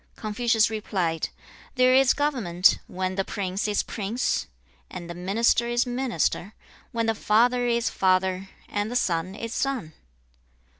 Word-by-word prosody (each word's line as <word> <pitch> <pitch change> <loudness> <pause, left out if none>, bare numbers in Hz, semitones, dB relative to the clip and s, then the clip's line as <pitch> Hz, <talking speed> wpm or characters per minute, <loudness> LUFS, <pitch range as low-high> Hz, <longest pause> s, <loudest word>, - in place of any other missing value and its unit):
2. - - -20
Confucius 225 +1 +2
replied, 185 -7 -1 0.5
'There 255 0 +5
is 265 0 +5
government, 225 -12 +2
when 185 0 -3
the 195 +1 0
prince 195 +1 -3
is 205 -1 +1
prince, 220 +4 -2 0.4
and 175 - -7
the 170 - -6
minister 210 +6 +1
is 240 +1 +1
minister; 245 - -1 0.4
when 230 -1 -1
the 225 - +2
father 245 +3 +2
is 235 0 +1
father, 185 0 +1 0.2
and 205 +1 -2
the 245 - -5
son 180 -4 0
is 230 +1 -5
son.' 255 - -2
215 Hz, 145 wpm, -25 LUFS, 185-240 Hz, 0.5 s, There